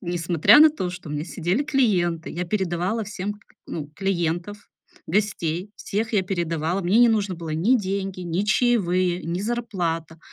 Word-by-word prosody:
несмотря 175 - +4
на 310 0 +8
то, 190 -13 -3
что 180 -3 -9
у - - -5
меня 150 +1 -3
сидели 180 - -1
клиенты, 195 - +1
я 175 +2 -3
передавала 190 +3 -1
всем 205 0 -4
к - - -18 0.3
ну, 150 -3 -5
клиентов, 190 +1 -2 0.4
гостей, 185 -1 -1
всех 220 +3 -3
я 205 -3 +3
передавала. 170 -1 -1
Мне 185 +6 +3
не 240 0 +7
нужно 205 -4 +1
было 165 -1 -7
ни 180 +12 +3
деньги, 195 -1 -3
ни 175 +2 -1
чаевые, 185 -6 +1
ни 170 +2 -3
зарплата. 180 -8 -3
185 Hz, 165 wpm, -24 LUFS, 170-210 Hz, 0.4 s, на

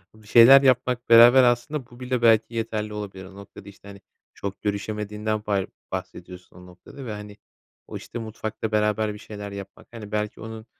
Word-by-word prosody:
Bir 110 -1 -19
şeyler 120 +5 +8
yapmak 125 -2 +1
beraber 120 +3 +8
aslında 125 +2 0
bu 120 +1 -16
bile 125 -1 -2
belki 115 0 +3
yeterli 110 -2 -3
olabilir. 95 -3 -7
O 95 +1 -14
noktada 100 0 -13
işte, 100 0 -17
hani, 100 -1 -12 0.3
çok 100 -1 -7
görüşemediğinden 105 +1 -3
bar 100 -2 0 0.2
bahsediyorsun 90 0 -8
o 90 - -14
noktada 90 +9 -13
ve, 115 - -5
hani, 105 0 -10 0.5
o - - -7
işte 120 - -8
mutfakta 110 0 -6
beraber 105 0 0
bir 105 - -11
şeyler 105 -2 -9
yapmak. 100 0 -10
Hani, 110 -3 -10
belki 105 0 -3
onun, 110 0 -9
110 Hz, 180 wpm, -24 LUFS, 100-115 Hz, 0.5 s, şeyler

